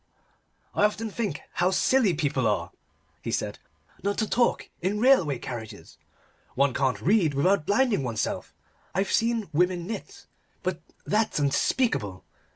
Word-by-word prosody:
"I -, -, +1 dB
often 215 Hz, +1 st, -1 dB
think 200 Hz, -9 st, -3 dB
how 175 Hz, +1 st, +2 dB
silly 205 Hz, 0 st, +3 dB
people 140 Hz, -6 st, 0 dB
are," 85 Hz, -5 st, -1 dB, 0.5 s
he -, -, -5 dB
said, -, -, -2 dB, 0.4 s
"not 200 Hz, +1 st, -1 dB
to 220 Hz, -, 0 dB
talk 240 Hz, +2 st, +1 dB
in 200 Hz, +4 st, 0 dB
railway 220 Hz, -, +4 dB
carriages. 110 Hz, -4 st, -8 dB, 0.6 s
One 140 Hz, 0 st, +3 dB
can't 130 Hz, -1 st, +1 dB
read 175 Hz, -6 st, +3 dB
without 170 Hz, +3 st, +2 dB
blinding 220 Hz, -, +3 dB
oneself. 115 Hz, -4 st, -2 dB, 0.4 s
I've 195 Hz, +1 st, 0 dB
seen 230 Hz, -2 st, +1 dB
women 175 Hz, +2 st, +1 dB
knit, 220 Hz, +3 st, -7 dB, 0.4 s
but -, -, -2 dB, 0.2 s
that's 215 Hz, +1 st, +1 dB
unspeakable. 140 Hz, -, 0 dB
180 Hz, 135 wpm, -26 LUFS, 140-215 Hz, 0.6 s, railway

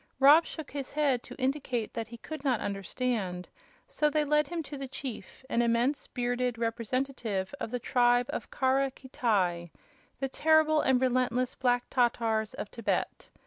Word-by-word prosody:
Rob 290 Hz, +5 st, +7 dB
shook 315 Hz, -3 st, -7 dB
his 275 Hz, -2 st, -5 dB
head 285 Hz, -5 st, +2 dB
to 250 Hz, -, -11 dB
indicate 260 Hz, -4 st, -1 dB
that 225 Hz, -2 st, -4 dB
he 235 Hz, +1 st, -10 dB
could 310 Hz, +4 st, -8 dB
not 255 Hz, -6 st, +2 dB
understand; 195 Hz, -2 st, -2 dB, 0.4 s
so 300 Hz, -12 st, +1 dB
they 300 Hz, 0 st, +1 dB
led 300 Hz, 0 st, +2 dB
him 340 Hz, 0 st, -3 dB
to 290 Hz, -, -8 dB
the 275 Hz, -1 st, -5 dB
chief 260 Hz, -1 st, -8 dB
an 235 Hz, -, +1 dB
immense, 240 Hz, +4 st, +1 dB
bearded 245 Hz, -1 st, -1 dB
representative 230 Hz, -3 st, -2 dB
of -, -, -3 dB
the 245 Hz, -, -2 dB
tribe 245 Hz, 0 st, +3 dB
of 295 Hz, -, -4 dB
Kara 270 Hz, +1 st, +2 dB
Khitai, 200 Hz, -10 st, -1 dB, 0.5 s
the 270 Hz, -, 0 dB
terrible 310 Hz, +2 st, +3 dB
and 260 Hz, -1 st, +3 dB
relentless 255 Hz, -1 st, +1 dB
Black 245 Hz, -1 st, +1 dB
Tatars 225 Hz, -3 st, +1 dB
of 205 Hz, -, -5 dB
Thibet. 230 Hz, -3 st, -2 dB
250 Hz, 160 wpm, -29 LUFS, 230-275 Hz, 0.5 s, Rob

